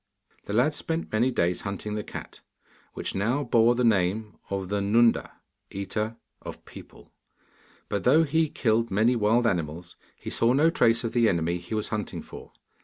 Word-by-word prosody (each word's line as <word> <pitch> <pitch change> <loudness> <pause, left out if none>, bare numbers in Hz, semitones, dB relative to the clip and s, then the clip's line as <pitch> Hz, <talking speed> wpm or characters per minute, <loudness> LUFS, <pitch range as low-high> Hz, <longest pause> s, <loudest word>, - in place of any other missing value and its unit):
The 100 - -5
lad 125 +8 +3
spent 165 +2 -4
many 115 +4 +2
days 90 -8 0
hunting 100 +1 -5
the 105 0 -3
cat, - - -9 0.5
which - - -4
now 120 +9 0
bore 120 -1 +3
the 125 - 0
name 105 -1 +1
of 95 -2 -3
'The 100 0 -1
Nunda, 115 +3 +3 0.4
eater 105 +3 -3 0.3
of - - -9
people,' - - -14 0.8
but 100 -2 -2
though 155 +6 +5
he 160 +1 +1
killed 115 -2 0
many 110 +6 +2
wild 115 +2 +2
animals 85 -3 -2 0.2
he - - -8
saw 115 +2 +2
no 155 +5 +4
trace 115 -6 +2
of 115 - -3
the 120 -2 +4
enemy 85 0 0
he 90 +6 -6
was 105 - -2
hunting 105 -2 -4
for. - - -12
110 Hz, 175 wpm, -26 LUFS, 100-120 Hz, 0.8 s, though